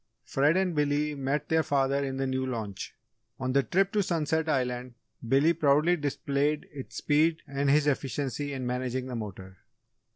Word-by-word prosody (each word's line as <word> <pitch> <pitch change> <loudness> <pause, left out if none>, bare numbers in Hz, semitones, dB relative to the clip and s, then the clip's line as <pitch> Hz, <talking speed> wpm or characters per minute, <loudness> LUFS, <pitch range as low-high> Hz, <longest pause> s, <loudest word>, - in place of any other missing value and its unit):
Fred 145 +7 +2
and 190 -2 +1
Billy 150 0 +1
met 140 +1 -2
their 160 0 +3
father 140 -1 +1
in 135 -1 -3
the 135 - 0
new 130 0 -1
launch. 110 -7 -5 0.4
On 130 0 -1
the 140 - +5
trip 190 - +1
to 210 - +2
Sunset 160 -3 0
Island, 125 -3 -1 0.3
Billy 140 +7 +4
proudly 155 +2 +3
displayed 145 0 -1
its 135 -2 -8
speed 160 +2 +2
and 140 0 0
his 145 +1 +4
efficiency 140 0 -1
in 130 -2 -4
managing 125 +1 -2
the 130 -1 -5
motor. 95 -4 -7
140 Hz, 165 wpm, -28 LUFS, 130-150 Hz, 0.4 s, the